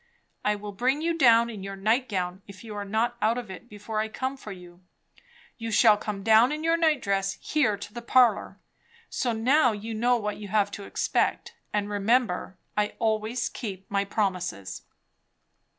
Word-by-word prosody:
I 210 0 +2
will 205 0 -7
bring 260 +9 0
you 335 0 +1
down 235 -6 +5
in 210 -3 -8
your 195 +1 -6
nightgown, 195 -4 -1
if 200 0 -12
you 220 -2 -8
are 205 - -3
not 220 +4 -1
out 225 +3 +2
of 235 -6 -6
it 235 +6 -11
before 210 +1 -5
I 215 - 0
come 260 +4 -3
for 220 -6 -10
you; 180 -1 -12 0.8
you 230 0 -4
shall 220 0 +6
come 205 -1 -5
down 225 +4 +5
in 305 +1 -3
your 330 +1 +3
night 315 -5 +2
dress, 195 -1 0
here, 260 -10 +1
to 205 0 -9
the 240 - -6
parlour. 240 -1 +3 0.5
So 245 - 0
now 245 +3 +3
you 215 +2 -6
know 240 +3 +2
what 210 -2 -3
you 210 - -8
have 205 0 +1
to 200 0 -7
expect; - - -1 0.2
and 205 -1 -1
remember, 205 -2 0 0.2
I 210 0 0
always 220 +2 0
keep 195 -5 -7
my 200 0 +1
promises." 185 - -2
215 Hz, 180 wpm, -27 LUFS, 200-240 Hz, 0.8 s, shall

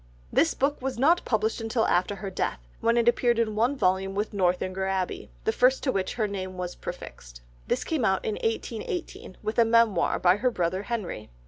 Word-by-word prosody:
This 325 - +3
book 280 +1 0
was 260 -2 -3
not 320 +8 +4
published 220 0 0
until 225 +1 0
after 180 +3 +1
her 195 0 -6
death, 185 - -2 0.2
when 230 +1 +2
it 235 0 +2
appeared 240 0 +3
in 225 -2 +1
one 240 +6 +2
volume 190 -1 +1
with 210 +2 -2
Northanger 185 0 0
Abbey, 190 -1 -2
the - - +2
first 255 +3 +3
to 265 - +2
which 190 -3 -2
her 220 -3 0
name 185 -2 -5
was 180 -1 -4
prefixed, - - -9 0.3
this - - 0
came 315 -6 -1
out 190 -3 +1
in 215 - 0
1818 225 - -4
with 215 +2 -1
a - - +8
Memoir 220 -6 +3
by 180 +1 +4
her 250 +4 +2
brother 185 -4 -1
Henry. 205 - -4
215 Hz, 200 wpm, -27 LUFS, 185-240 Hz, 0.3 s, a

